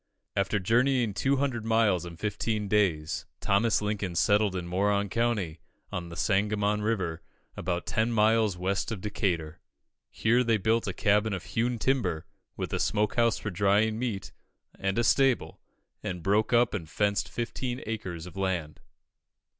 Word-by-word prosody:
After 100 +1 +1
journeying 120 +3 +2
200 135 0 0
miles 110 -6 +2
in 85 -1 -9
fifteen 105 +1 -2
days, 95 -7 +1
Thomas 105 +2 +2
Lincoln 105 -4 -2
settled 105 +3 +3
in 90 -2 -3
Moron 100 +3 +1
County, 105 -8 -1 0.3
on 85 -1 -4
the 85 - -8
Sangamon 105 +2 +1
River, 90 -7 -1 0.3
about 85 0 -2
ten 120 -2 0
miles 110 -3 +3
west 95 +4 -1
of 110 - -3
Decatur. 85 -6 -2 0.5
Here 120 +3 +2
they 115 -2 +2
built 110 +3 +1
a 95 - -2
cabin 105 +2 +2
of 95 -2 -4
hewn 120 +2 -1
timber, 115 -10 0 0.3
with - - -4
a - - 0
smoke 105 -1 +1
house 115 -1 +3
for 105 - -4
drying 105 +4 +2
meat, 115 -6 -3 0.4
and 95 +1 -2
a 120 - +3
stable, 135 +2 +2 0.4
and 90 -2 -5
broke 105 +2 +2
up 120 0 +4
and 85 -7 -4
fenced 100 +4 0
fifteen 120 +1 -4
acres 95 -7 -5
of 90 - -11
land. 90 -5 -2
105 Hz, 155 wpm, -28 LUFS, 95-115 Hz, 0.5 s, up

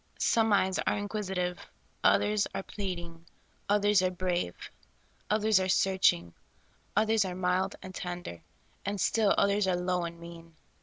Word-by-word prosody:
Some 225 -1 +2
eyes 190 -2 +2
are - - +2
inquisitive; 190 -4 -3 0.4
others 210 0 +3
are 195 - -3
pleading; 170 -5 -6 0.4
others 205 -1 +4
are 185 - +2
brave; 180 - -2 0.7
others 215 -1 +3
are 185 0 -1
searching; 185 - +2 0.6
others 220 -1 +3
are 185 -2 -4
mild 185 +2 0
and 185 - -8
tender; 175 - -6 0.4
and 200 0 -3
still 215 +1 +2
others 200 0 +2
are 185 - +2
low 180 0 -1
and 170 0 -7
mean. 170 -1 -12
185 Hz, 140 wpm, -29 LUFS, 175-205 Hz, 0.7 s, others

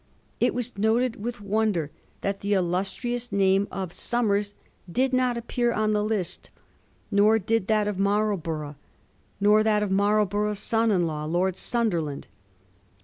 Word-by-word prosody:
It - - +2
was 245 0 -4
noted 225 +1 +1
with 240 0 -4
wonder 200 -7 0 0.3
that 195 0 -2
the 200 +1 0
illustrious 200 +7 -2
name 195 0 +3
of 185 -2 -5
Somers 205 -4 0 0.4
did 260 +6 +1
not 255 -1 +2
appear 240 +1 -1
on 215 -1 +1
the 210 0 +1
list, 210 -5 -3 0.6
nor 210 +2 +5
did 220 -1 0
that 215 -1 +2
of 205 -2 -3
Marlborough 185 -8 -1 0.6
nor 210 +1 +5
that 215 -1 +2
of 200 - -2
Marlborough's 205 +1 +1
son 225 +2 +1
in 180 -5 +2
law. 150 -2 -3
Lord 175 +3 0
Sunderland. 175 -14 -1
210 Hz, 145 wpm, -26 LUFS, 190-225 Hz, 0.6 s, nor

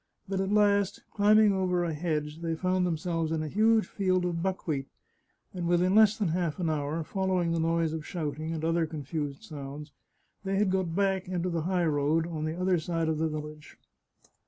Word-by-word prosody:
But 190 0 -1
at 195 +1 -1
last, 205 -2 +2
climbing 210 0 +5
over 180 -2 +1
a 165 -2 -1
hedge, 150 -1 -2
they 165 -1 -2
found 185 +1 +1
themselves 165 -1 -1
in 160 -1 -1
a - - -3
huge 220 +6 +3
field 185 -2 0
of 170 -1 -2
buckwheat, 165 -7 -2 0.7
and 175 -2 -3
within 175 +2 +3
less 215 0 +6
than 205 -6 0
half 170 -2 -1
an 170 -4 0
hour, 150 +2 -2
following 185 -1 0
the 165 - 0
noise 165 -1 +1
of 160 -1 -4
shouting 155 -1 -4
and 160 -1 -3
other 165 0 +1
confused 145 -2 -5
sounds, 145 0 -8 0.5
they 195 0 -1
had 195 -1 +2
got 185 -3 -1
back 195 -1 +1
into 180 0 -2
the 170 -1 -1
high 180 -2 +1
road 155 +1 +1
on 160 -2 -4
the 160 +3 -3
other 185 -1 +2
side 165 0 -1
of 155 -1 -1
the 160 0 +1
village. 150 -1 -8
170 Hz, 195 wpm, -29 LUFS, 155-185 Hz, 0.7 s, less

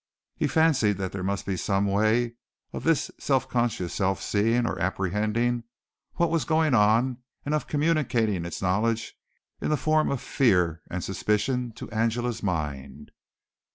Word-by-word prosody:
He - - 0
fancied 135 - +3
that 95 -1 -3
there 95 - -5
must 100 +1 -2
be 95 - -1
some 100 +2 0
way 110 +4 +2 0.4
of - - -5
this 160 -3 +1
subconscious 120 -8 0
self 95 -1 0
seeing 115 +4 +1
or - - -2
apprehending 105 +6 0 0.5
what 170 -1 +1
was 165 -2 +1
going 155 -2 +2
on 115 +4 +3 0.3
and 145 - -1
of 150 - -1
communicating 135 - +1
its 85 +2 -5
knowledge 110 +5 0 0.5
in - - -1
the 150 - +2
form 155 +2 +2
of 140 - -1
fear 90 - +2
and - - -4
suspicion 120 +3 -1
to - - -8
Angela's 115 +2 -1
mind. 75 -6 -4
115 Hz, 150 wpm, -26 LUFS, 95-130 Hz, 0.5 s, fancied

